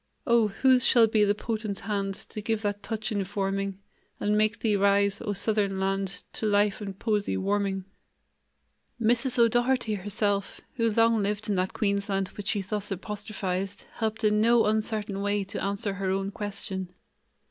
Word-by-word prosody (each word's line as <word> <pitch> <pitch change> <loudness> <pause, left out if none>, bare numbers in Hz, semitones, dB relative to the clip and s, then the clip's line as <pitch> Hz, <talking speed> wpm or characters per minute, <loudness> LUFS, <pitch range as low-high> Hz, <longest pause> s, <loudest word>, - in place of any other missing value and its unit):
Oh, 235 -4 +4
whose 255 +4 +3
shall 235 -3 +6
be 215 -1 +3
the 205 0 +2
potent 215 -2 -3
hand 200 -1 -2
To 215 - -8
give 220 +1 -1
that 205 0 -1
touch 225 +1 -3
informing, 195 -1 -2 0.4
And 210 +1 +1
make 215 +1 +1
thee 215 -3 +2
rise, 200 +1 +3
O 210 -3 -2
Southern 200 -1 +1
Land, 195 -1 -2
To 220 - -2
life 205 0 +2
and 195 -2 -6
poesy 210 -1 0
warming?" 195 -1 -1 1.1
Mrs. 240 +3 +1
O'Doherty 240 0 +3
herself, 205 0 -1
who 230 -5 +1
long 225 0 +3
lived 210 +2 -2
in 205 - +2
that 185 +1 0
Queensland 200 -2 0
which 205 -1 -8
she 205 -2 +1
thus 205 +1 -3
apostrophized, 195 -1 -4
helped 220 0 -2
in 210 0 +3
no 235 +1 +5
uncertain 215 -2 -1
way 205 0 0
to 195 - -5
answer 200 +1 -1
her 195 0 -2
own 195 +1 -1
question. 195 -3 -5
205 Hz, 160 wpm, -27 LUFS, 195-220 Hz, 1.1 s, shall